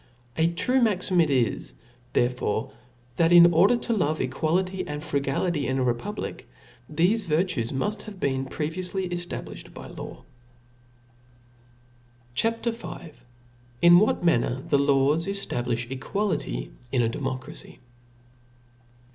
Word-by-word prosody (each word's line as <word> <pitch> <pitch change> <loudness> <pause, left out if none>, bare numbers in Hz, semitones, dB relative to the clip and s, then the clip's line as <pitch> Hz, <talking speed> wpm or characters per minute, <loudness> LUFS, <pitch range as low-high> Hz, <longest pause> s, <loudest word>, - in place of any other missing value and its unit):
A 160 +1 +3
true 250 +10 +1
maxim 185 -5 +2
it 160 - +2
is 120 - 0 0.4
therefore, 120 -3 0 0.4
that 165 0 +3
in 175 0 +8
order 195 +9 +5
to 235 0 -1
love 155 -7 0
equality 175 +8 0
and 150 0 -5
frugality 140 +2 -1
in 130 - 0
a 130 - +1
republic, 125 - -3 0.4
thefc 185 +8 +2
vir 155 +2 +3
tues 140 -12 -3
muft 205 +10 -2
have 200 -3 -12
been 135 -3 -1
previoufly 180 +6 -3
eftabliihed 175 0 -6
by - - -9
law. - - -9 2.1
CHAP. 225 - +1
«i 235 - +2
THESPIRIT 230 +1 -7
CHAP. 160 -3 -11
V. - - -21 0.6
In 175 0 +9
what 210 -3 +1
manner 130 -4 +2
the 140 - +3
Laws 140 +4 +2
ejiablijh 125 -11 -2
Equality 135 - -2 0.2
in 130 - +2
a - - +2
Democracy. 130 +2 -5
160 Hz, 130 wpm, -26 LUFS, 130-185 Hz, 2.1 s, In